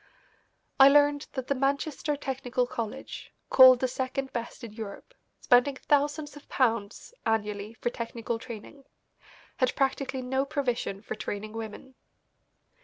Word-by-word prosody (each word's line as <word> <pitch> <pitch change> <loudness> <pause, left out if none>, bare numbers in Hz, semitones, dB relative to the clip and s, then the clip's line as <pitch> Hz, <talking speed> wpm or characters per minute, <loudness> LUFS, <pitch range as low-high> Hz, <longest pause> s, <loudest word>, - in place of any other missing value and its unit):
I 270 +1 +10
learned 290 0 +4
that 260 -3 -4
the 280 - +1
Manchester 280 +2 -1
Technical 260 -3 -2
College, 230 -3 -6 0.2
called 255 -1 +9
the 260 - +2
second 265 +1 -3
best 235 +1 -5
in 225 -3 -8
Europe, 220 - -8 0.3
spending 250 +2 +4
thousands 295 +2 0
of 290 - -14
pounds 230 - -1
annually 210 -1 -1
for 240 - -2
technical 230 -1 -4
training, 240 +4 -10 0.7
had 255 -1 +1
practically 265 -1 -1
no 265 +2 0
provision 255 -8 -2
for - - -4
training 215 +1 -5
women. 225 +3 -7
255 Hz, 130 wpm, -28 LUFS, 230-275 Hz, 0.7 s, I